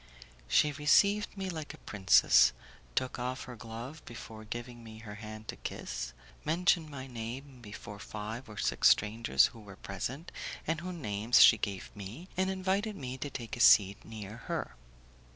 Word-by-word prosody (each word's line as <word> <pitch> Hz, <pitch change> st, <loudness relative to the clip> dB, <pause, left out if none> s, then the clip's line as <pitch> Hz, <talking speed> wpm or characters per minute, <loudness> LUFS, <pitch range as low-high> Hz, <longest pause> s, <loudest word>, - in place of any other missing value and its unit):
She 150 Hz, -, +4 dB
received 200 Hz, +9 st, +3 dB
me 190 Hz, -1 st, -3 dB
like 160 Hz, -4 st, -5 dB
a -, -, -22 dB
princess, 65 Hz, -, +5 dB, 0.4 s
took 130 Hz, -, -1 dB
off 125 Hz, +1 st, -3 dB
her 125 Hz, -, -8 dB
glove 115 Hz, +7 st, -8 dB
before 110 Hz, -2 st, -9 dB
giving 120 Hz, +2 st, -7 dB
me 110 Hz, -1 st, -10 dB
her 110 Hz, -2 st, -9 dB
hand 110 Hz, +1 st, -9 dB
to -, -, -3 dB
kiss, -, -, -5 dB, 0.3 s
mentioned 165 Hz, 0 st, +2 dB
my 135 Hz, -3 st, -7 dB
name 125 Hz, +2 st, -7 dB
before 105 Hz, -1 st, -9 dB
five 110 Hz, +5 st, -6 dB
or 105 Hz, -, -10 dB
six -, -, +4 dB
strangers 105 Hz, -9 st, +4 dB
who 115 Hz, -, -12 dB
were 100 Hz, -2 st, -11 dB
present, 125 Hz, -, -5 dB, 0.3 s
and 160 Hz, 0 st, -1 dB
whose 180 Hz, 0 st, -5 dB
names 110 Hz, -5 st, +4 dB
she 115 Hz, -, +8 dB
gave 100 Hz, -2 st, -4 dB
me, 110 Hz, -, -8 dB
and 190 Hz, +1 st, +1 dB
invited 190 Hz, +3 st, 0 dB
me 130 Hz, -6 st, -5 dB
to 145 Hz, -, -3 dB
take 120 Hz, -4 st, -6 dB
a -, -, -9 dB
seat 100 Hz, -3 st, +6 dB
near 110 Hz, -1 st, -8 dB
her. -, -, -3 dB
120 Hz, 170 wpm, -31 LUFS, 105-150 Hz, 0.4 s, she